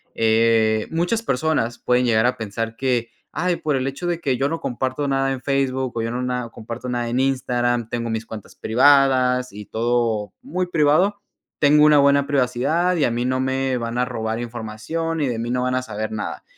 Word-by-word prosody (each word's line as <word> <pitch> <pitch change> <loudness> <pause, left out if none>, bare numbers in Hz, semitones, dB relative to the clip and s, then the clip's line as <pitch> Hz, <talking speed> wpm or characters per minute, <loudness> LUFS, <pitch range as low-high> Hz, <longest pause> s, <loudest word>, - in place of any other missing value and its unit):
eh, 110 -1 +2
muchas 175 +8 0
personas 125 - 0
pueden 125 0 +2
llegar 110 -1 +3
a 125 - -1
pensar 115 +1 -4
que, 125 -3 0 0.2
ay, 180 -1 -1
por 150 -2 -1
el 130 +1 -1
hecho 140 +6 -4
de 170 -1 -2
que 130 -4 0
yo 135 +2 +1
no 165 - -3
comparto 130 +3 -2
nada 135 0 +1
en 130 - -6
Facebook, 130 -3 -1
o - - 0
yo 115 - -2
no 125 +1 -3
nada, 125 -1 -2
o - - -18
comparto 115 +3 -7
nada 120 -1 -2
en 125 +2 0
Instagram, 120 -3 0
tengo 115 -1 -3
mis 110 0 -3
cuentas 105 -4 -10
privadas 130 +1 +3
y 105 0 -8
todo 115 -2 -1
muy 185 -9 -3
privado. 170 +5 +2 0.4
Tengo 150 +1 +5
una 150 -1 +6
buena 140 0 +4
privacidad 145 +7 +1
y 150 - +2
a 120 - 0
mí 120 +1 -1
no 130 0 0
me 130 0 0
van 115 0 -4
a 125 - +2
robar 110 -2 -3
información 120 +8 -4
y 140 - +1
de 115 -2 -2
mí 120 +1 -3
no 125 0 0
van 125 0 0
a 130 - -1
saber 110 -2 -5
nada. 110 - -5
125 Hz, 210 wpm, -22 LUFS, 115-140 Hz, 0.4 s, una